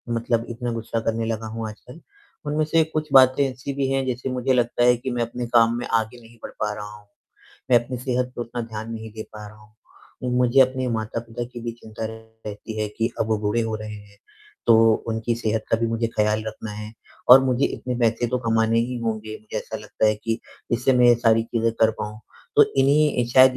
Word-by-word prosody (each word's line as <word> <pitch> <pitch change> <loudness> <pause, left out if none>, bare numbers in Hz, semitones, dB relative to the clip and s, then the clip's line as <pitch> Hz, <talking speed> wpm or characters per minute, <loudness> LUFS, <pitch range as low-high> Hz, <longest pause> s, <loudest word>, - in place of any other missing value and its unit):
मतलब 115 0 0
इतना 120 +1 -4
गुस्सा 115 0 -3
करने 115 0 -1
लगा 110 0 -3
हूँ 115 -1 -3
आजकल। 125 +8 -13 0.5
उनमें 150 +1 0
से 160 +1 +3
कुछ 155 0 -1
बातें 130 +1 +7
ऐसी 130 +2 -6
भी 135 -1 -1
हैं, 135 0 +1
जैसे 130 +1 -3
मुझे 130 +1 0
लगता 120 0 +1
है 125 0 +5
कि 130 +2 -4
मैं 120 -1 -1
अपने 120 +1 -4
काम 115 0 +5
में 120 - -4
आगे 115 +1 -1
नहीं 115 +1 -17
बढ़ - - -7
पा 105 0 -1
रहा 105 0 -7
हूँ। 105 -1 -17 0.6
मैं 120 -2 +5
अपनी 125 +1 -5
सेहत 125 0 -1
को - - -6
उतना 120 +1 -4
ध्यान 110 0 -6
नहीं 110 -1 -7
दे 110 0 -6
पा 105 -1 -9
रहा 105 +1 -13
हूँ। 105 0 -20 0.5
उ, 125 - -2
मुझे 125 +2 +4
अपने 130 0 +3
माता-पिता 115 +1 -3
की 120 - -7
भी 115 0 -4
चिंता 110 0 -7
रहती 110 -1 -8
है 105 - -1
कि 115 +3 -2
अब - - +2
वो 110 -1 +1
बूढ़े 105 +2 0
हो 110 -1 -2
रहे 110 0 -7
हैं। 100 -1 -14 0.5
तो 115 - +7 0.3
उनकी 115 +1 -1
सेहत 110 -1 -1
का - - +4
भी 115 - 0
मुझे 115 0 0
ख़याल 105 0 +2
रखना 110 0 -6
है 105 +1 -7 0.4
और 130 +2 +11
मुझे 130 +1 +2
इतने 125 -1 -4
पैसे 115 +1 +2
तो 125 +1 0
कमाने 115 -1 +2
ही 125 +2 -2
होंगे 110 -1 -3
मुझे 110 - -8
ऐसा - - -6
लगता - - -1
है 110 - +3
कि 115 +2 -2 0.3
जिससे 125 +3 +2
मैं 125 0 +6
ये 120 - +7
सारी 115 -1 +3
चीज़ें 115 0 0
कर 110 - +6
पाऊँ। 105 +1 -5 0.4
तो - - +9 0.2
इन्हीं 140 -2 +3
शायद 130 0 +7
115 Hz, 225 wpm, -23 LUFS, 110-125 Hz, 0.6 s, और